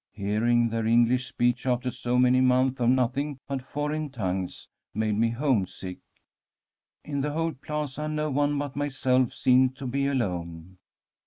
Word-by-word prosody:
Hearing 110 +4 +1
their 115 0 -1
English 120 +2 +3
speech 120 +2 0
after 125 0 0
so 120 0 -1
many 125 +1 +4
months 130 +1 +3
of 120 - +3
nothing 130 +3 +1
but 135 -1 -3
foreign 150 +3 -3
tongues 95 -7 -4 0.3
made 110 0 0
me 115 +2 +2
homesick. 115 -8 -1 1.1
In 140 -2 -2
the 145 +1 -2
whole 165 +1 0
plaza, 150 +1 -4
no 155 0 -1
one 145 +1 +1
but 145 -1 -4
myself 130 -3 +1
seemed 130 0 +3
to 140 - -7
be 140 +2 0
alone. 90 -8 -3
130 Hz, 150 wpm, -27 LUFS, 115-140 Hz, 1.1 s, many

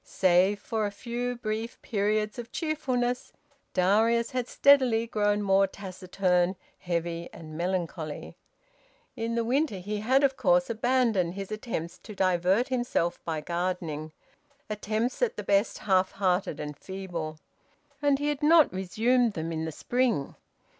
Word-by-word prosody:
Save 185 +2 +3
for 215 0 -1
a - - -5
few 245 +4 -3
brief 225 0 -4
periods 210 +1 0
of 235 0 -7
cheerfulness, 255 -6 -1 0.4
Darius 225 +5 +3
had 250 -1 -2
steadily 255 -5 +4
grown 205 -2 +1
more 195 0 +4
taciturn, 185 -1 -1 0.2
heavy 170 -1 -3
and 155 -1 -10
melancholy. 170 -3 -3 0.8
In 230 +1 -2
the 235 - +1
winter 260 -1 +1
he 205 +3 -4
had 260 +7 +2
of 270 -1 +3
course 265 -2 +3
abandoned 225 -6 +1
his 195 +1 -6
attempts 195 -6 -4
to 215 - -10
divert 185 +5 +2
himself 240 -9 -1
by 160 -2 -2
gardening 170 -2 -3 0.6
attempts 215 - -2
at - - +1
the - - -4
best 200 +2 +2
half 190 -2 +2
hearted 185 -5 0
and 150 0 -5
feeble 175 -5 -5 0.6
and 285 -1 +3
he 290 +1 -1
had 295 0 -2
not 310 - +6
resumed 225 +6 +1
them 165 -1 -4
in 160 0 -2
the 160 - -3
spring. 240 - 0
205 Hz, 140 wpm, -28 LUFS, 180-245 Hz, 0.8 s, not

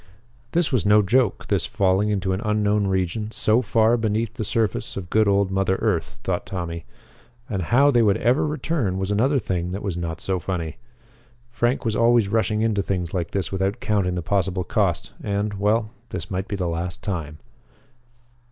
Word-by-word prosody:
This 170 -2 +2
was 125 -5 +2
no 105 +1 +5
joke, 115 +1 +1
this - - 0
falling 95 +2 +2
into 95 -2 0
an 95 - -2
unknown 105 -1 +1
region 95 +3 -1
so 110 +1 +2
far 115 0 +3
beneath 110 0 -1
the 120 -3 -4
surface 110 -1 -1
of 90 -3 -6
good 110 -1 +4
old 100 -1 +2
mother 95 0 +1
earth, 95 -6 -1
thought - - -2
Tommy. 85 -3 -5 0.6
And 100 -7 -2
how 135 - +4
they 120 -3 +4
would 105 -3 +3
ever 125 +6 +2
return 145 - -1
was 95 +1 -2
another 130 +8 +2
thing 90 -7 -2
that 100 - -5
was 100 -4 -2
not 85 -1 -4
so 95 -1 -1
funny. 85 -3 -4 0.7
Frank 120 +2 0
was 110 -2 0
always 115 -3 +4
rushing 110 0 +1
into 110 -3 +1
things 90 -3 -3
like 90 -3 -2
this 100 -2 -2
without 95 +3 -1
counting 100 -6 0
the 90 - -3
possible 95 0 0
cost - - 0
and 100 0 -1
well 105 +2 +1 0.2
this 85 -2 -6
might 95 +1 -2
be 105 - -3
the 90 -3 -2
last 85 +1 -3
time. 80 -6 -4
100 Hz, 185 wpm, -23 LUFS, 95-110 Hz, 0.7 s, no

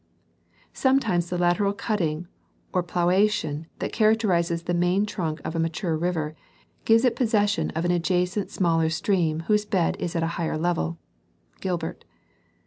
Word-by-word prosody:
Sometimes 225 -11 +2
the 180 - -2
lateral 180 +3 +2
cutting 180 -6 -2 0.5
or 180 - +2
planation 175 -3 +1
that - - -4
characterizes 185 -7 +2
the 175 - -2
main 180 +4 +2
trunk 165 -7 -3
of 160 - -4
a - - 0
mature 165 +1 -1
river 160 -2 -2 0.5
gives 225 +2 +5
it 240 -2 +2
possession 210 -5 +1
of 165 +2 -1
an 175 - +2
adjacent 180 +3 0
smaller 165 -3 +1
stream 160 -1 0
whose 210 +5 +2
bed 190 -5 +1
is 175 - -3
at 165 - +1
a 170 +1 -2
higher 160 -1 -1
level 170 0 -1 0.6
(Gilbert). 175 -4 -3
175 Hz, 145 wpm, -25 LUFS, 165-205 Hz, 0.6 s, gives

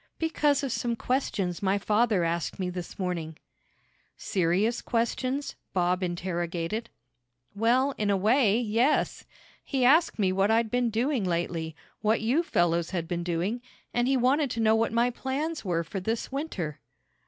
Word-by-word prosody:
"Because 300 -3 +1
of 270 - -1
some 235 0 -1
questions 210 -9 -1
my 195 0 +2
father 210 -1 +2
asked 170 0 -1
me 180 -1 -2
this 180 -1 -7
morning." 170 -4 -3 0.8
"Serious 195 +6 +1
questions?" 255 +4 -1 0.2
Bob 180 0 +1
interrogated. 175 +3 -3 0.6
"Well, 245 +6 +2
in 210 -1 +1
a 200 - +3
way, 220 +2 +3
yes. 240 +5 +1 0.4
He 265 -3 0
asked 315 +6 +4
me 195 -4 +2
what 195 +2 +2
I'd 225 0 +2
been 245 -1 +2
doing 240 +2 0
lately, 170 -2 -2 0.3
what 220 +1 +2
you 245 +9 +2
fellows 170 - +1
had 175 -3 -3
been 175 0 -2
doing, 180 +7 -1 0.3
and 240 0 +1
he 270 0 +3
wanted 270 +3 +2
to 230 - -4
know 220 -1 +4
what 225 +1 +1
my 235 +2 +2
plans 290 +6 -3
were 170 -4 0
for 190 +4 -5
this 220 +7 -3
winter." 210 - -4
215 Hz, 155 wpm, -28 LUFS, 180-245 Hz, 0.8 s, asked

